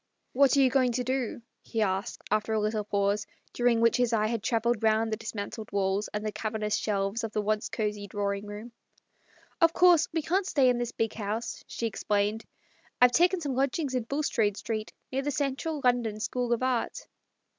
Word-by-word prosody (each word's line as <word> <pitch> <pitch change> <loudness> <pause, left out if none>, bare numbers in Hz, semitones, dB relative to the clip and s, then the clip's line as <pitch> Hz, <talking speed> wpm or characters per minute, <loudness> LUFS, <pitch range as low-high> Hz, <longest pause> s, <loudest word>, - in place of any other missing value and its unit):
" - - -48
What 275 +1 +4
are - - +6
you 260 -1 +4
going 255 -3 +3
to 250 +1 -1
do? 255 -2 -2
" - - -52
he 225 -2 -1
asked, 195 +3 -2
after 215 +1 +1
a 220 - +2
little 215 0 0
pause, 200 0 0 0.3
during 240 -1 +2
which 230 0 +4
his 245 -1 +1
eye 215 -1 +2
had 225 0 -1
travelled 230 0 0
round 220 0 +2
the - - +2
dismantled 220 0 -6
walls 200 +1 0
and 210 0 -3
cavernous 215 -1 -2
shelves 200 +2 -1
of 220 -1 -4
the 210 - 0
once 215 +1 0
cosey 210 -2 -3
drawing 200 0 -2
room. 210 +3 -8 0.9
"Of 330 0 +5
course 355 -3 +5
we 325 -1 -1
can't 370 +4 0
stay 270 -7 +4
in 245 -1 +1
this 240 -1 -2
big 225 -1 -1
house," 215 +2 -4
she 235 - -4
explained; 210 0 -1 0.3
" - - -34
I've 250 0 +7
taken 355 +5 +3
some 285 -4 -2
lodgings 270 +2 0
in 250 -3 -1
Bulstrode 230 -7 0
Street, 215 -1 -4 0.2
near 265 +1 0
the 285 - -2
Central 290 +2 -2
London 235 -4 +1
School 245 +2 -2
of 235 +1 +1
Art." 255 -3 -1
225 Hz, 200 wpm, -28 LUFS, 210-255 Hz, 0.9 s, I've